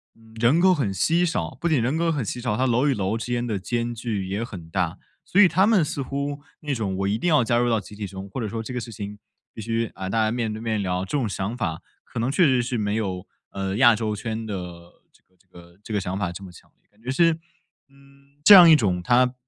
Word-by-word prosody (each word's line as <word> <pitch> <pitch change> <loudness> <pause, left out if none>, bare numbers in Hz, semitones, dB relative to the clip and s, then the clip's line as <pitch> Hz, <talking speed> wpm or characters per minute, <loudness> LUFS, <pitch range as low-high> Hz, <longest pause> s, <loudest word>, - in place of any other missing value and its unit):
嗯， 115 0 -20
人 120 +8 +4
口 185 0 +5
很 130 - -1
稀 165 - +2
少， 165 - -3
不 170 - -1
仅 155 -7 +2
人 130 +7 0
口 165 0 +1
很 140 -6 -1
稀 115 +4 -4
少， 120 -3 -1
它 130 +3 +1
楼 125 +4 +2
与 140 - +3
楼 105 0 -1
之 115 - -5
间 120 0 -1
的 110 -4 -2
间 120 +4 -2
距 110 -5 -3
也 100 +4 -2
很 95 -9 -9
大。 85 -1 -2 0.3
所 200 - +4
以 195 - +8
他 185 +4 +3
们 210 -5 +4
似 145 -2 -3
乎 140 +2 -4 0.2
那 145 -2 -3
种 100 -5 -2
“我 95 - -1
一 100 +2 0
定 125 - -2
要 150 -6 +4
加 120 0 +1
入 120 0 +2
到 115 -2 +2
集 105 - -12
体 105 0 -5
中”， 95 0 -8
或 95 - -6
者 110 - -2
说 110 +2 -4
“这 115 - -7
个 - - -1
事 115 0 -8
情 105 -1 -7 0.4
必 - - -10
须， 115 +1 -1
啊， 95 - -5
大 110 +3 +1
家 110 - +1
面 115 -2 -2
对 110 - -7
面 110 -2 -1
聊” 90 0 -1
这 95 +10 -2
种 125 -5 0
想 100 +3 -4
法， 85 -8 -3 0.2
可 - - -7
能 120 +3 0
确 170 +5 +4
实 130 -4 +3
是 120 0 -2
没 105 -1 -1
有 95 -4 -3 0.2
呃， 95 0 -3
亚 120 -2 +6
洲 110 -1 -2
圈 110 +1 -4
的 105 - -5 0.6
这 - - -28
个 95 - -38
这 95 - -32
个 85 0 -16
这 - - -10
个 105 - +2
想 95 0 -4
法 95 -4 -2
这 90 +3 -9
么 95 - -10
强 85 - -18
烈， - - -42
感 105 +1 -29
觉 125 - -7
是， 165 +5 +3 0.6
嗯， 140 0 -23
这 205 - +9
样 180 -4 +10
一 160 - +9
种 95 -10 +1
它 125 +4 +3
115 Hz, 295 characters per minute, -24 LUFS, 100-135 Hz, 0.6 s, 样